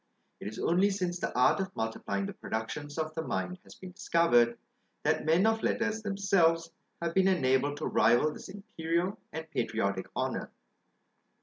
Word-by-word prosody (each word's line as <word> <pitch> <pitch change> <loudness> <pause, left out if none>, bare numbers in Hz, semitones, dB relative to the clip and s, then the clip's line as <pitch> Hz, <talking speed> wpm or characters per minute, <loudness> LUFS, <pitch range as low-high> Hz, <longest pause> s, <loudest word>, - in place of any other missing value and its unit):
It - - -6
is 110 - -6
only 185 +4 +3
since 180 -3 -2
the - - -2
art 125 - +4
of 190 0 -3
multiplying 105 -3 -2
the - - -5
productions 145 +7 -5
of 155 -1 -2
the 160 - -3
mind 180 +3 -3
has - - -14
been 185 -1 -10
discovered, 120 -10 +3 0.5
that - - +1
men 165 +6 +4
of 225 0 +2
letters 225 -1 0
themselves 180 -5 +2 0.3
have 170 0 -1
been 190 +1 +4
enabled 145 -5 +2
to 155 - -4
rival 120 +6 +3
this - - -10
imperial 185 -2 -2
and 160 +1 -6
patriotic 100 -5 -1
honour. - - -2
165 Hz, 165 wpm, -30 LUFS, 130-190 Hz, 0.5 s, art